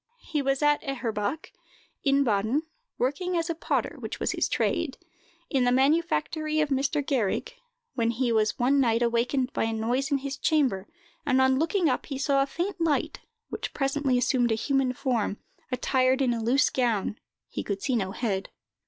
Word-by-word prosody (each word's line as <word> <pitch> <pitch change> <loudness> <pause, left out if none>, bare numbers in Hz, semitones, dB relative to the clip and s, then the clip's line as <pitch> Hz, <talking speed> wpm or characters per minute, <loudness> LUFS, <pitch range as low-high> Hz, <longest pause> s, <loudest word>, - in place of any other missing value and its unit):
He 300 -3 -1
was 275 +1 0
at 295 0 +3
Eherbach, 240 0 -3 0.5
in 275 0 +3
Baden, 220 +5 +1 0.3
working 345 +8 -1
as 335 +1 0
a - - 0
potter, 325 - -2
which - - -6
was - - 0
his - - 0
trade, 320 -6 0 0.5
in 270 -3 +1
the 245 - +3
manufactory 310 - +1
of 305 -1 +2
Mr. 275 +1 0
Gehrig, 260 - 0 0.4
when 230 -2 +1
he 240 +1 0
was 215 -2 +2
one 270 +3 +3
night 235 -2 +3
awakened 245 +3 0
by - - 0
a 225 - -1
noise 240 +5 0
in 280 - +2
his 275 0 -5
chamber, 255 - +1 0.4
and, 265 -4 +2
on 260 0 +4
looking 330 +2 +2
up, 255 - -1
he 275 - -4
saw 275 0 +2
a 275 - +1
faint 350 +5 -3
light, 315 -3 0 0.3
which - - -5
presently 275 -2 +1
assumed 245 -1 +2
a - - +3
human 270 +2 +1
form, 240 -5 -1 0.3
attired 255 +1 +2
in 255 -3 +2
a 230 - -3
loose 265 +5 +3
gown; 225 -5 0 0.3
he - - -4
could 200 -1 -4
see 260 - +1
no 195 -5 0
head. 195 -4 -2
265 Hz, 180 wpm, -27 LUFS, 235-285 Hz, 0.5 s, on